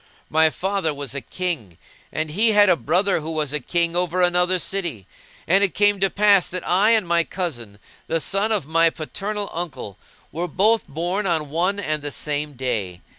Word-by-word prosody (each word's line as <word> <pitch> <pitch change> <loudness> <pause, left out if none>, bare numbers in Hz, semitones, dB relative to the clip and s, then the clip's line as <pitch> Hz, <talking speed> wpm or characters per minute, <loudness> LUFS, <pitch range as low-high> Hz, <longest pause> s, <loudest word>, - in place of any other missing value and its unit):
My 160 +1 +4
father 190 -3 -2
was 140 -2 -5
a 140 - -3
King 150 - -4 0.3
and 155 -1 -3
he 215 +6 +3
had 205 -1 +6
a 180 - +5
brother 175 - +1
who 155 +1 -6
was 155 -3 -2
a 150 - +1
King 170 +4 -1
over 180 0 0
another 180 +1 +3
city; 170 - -3 0.4
and 195 +4 +4
it 195 - 0
came 205 -1 +3
to 195 0 +2
pass 200 -1 +3
that 185 0 -5
I 195 +5 +4
and 215 -5 +1
my 170 0 +2
cousin, 120 - -5 0.3
the 165 - 0
son 200 +6 +1
of 205 -9 +1
my 165 +2 +3
paternal 200 +6 -4
uncle, 135 - -6 0.3
were 170 +3 -3
both 215 +5 +2
born 175 +7 -2
on 155 -5 -1
one 180 +5 0
and 155 -6 -2
the 145 - -4
same 150 +1 -2
day. 105 -9 -3
170 Hz, 190 wpm, -22 LUFS, 150-195 Hz, 0.4 s, had